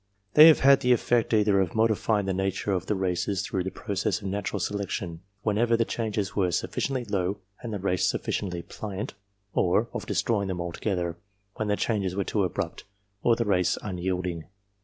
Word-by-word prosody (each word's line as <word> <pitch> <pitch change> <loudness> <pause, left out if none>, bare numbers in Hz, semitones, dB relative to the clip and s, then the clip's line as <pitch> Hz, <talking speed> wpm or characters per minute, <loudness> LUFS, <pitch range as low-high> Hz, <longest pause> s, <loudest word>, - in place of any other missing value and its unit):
They 155 +1 +10
have 160 - +6
had 140 0 +7
the 125 -2 +4
effect 120 -1 +1
either 105 -3 +4
of 90 -3 -2
modifying 110 -2 +2
the 95 - 0
nature 95 +2 -1
of 95 -1 -1
the 105 - +1
races 95 +1 -1
through 95 -8 -2
the 95 - -2
process 100 +1 -2
of 100 -2 -5
natural 100 +1 -2
selection 95 -4 -3 0.2
when 105 -1 +1
ever 115 0 +3
the 115 - +2
changes 110 -4 -2
were 95 -3 +2
sufficiently 130 +9 -1
slow 100 -3 -1 0.2
and 120 -2 -5
the 105 - -2
race 90 -2 +1
suffi - - -3 0.2
ciently 85 -1 -6
pliant, 105 0 -5 0.4
or 105 +6 +2
of - - -5
destroying 105 -4 0
them 95 -2 -3
altogether 85 0 -2 0.4
when 110 - -1
the 105 - +2
changes 100 -5 -1
were 100 - 0
too 100 +1 0
abrupt 90 - -3 0.4
or 115 - +4
the 115 - -1
race 90 -3 +2
unyielding. 90 -3 -3
100 Hz, 190 wpm, -27 LUFS, 95-110 Hz, 0.4 s, They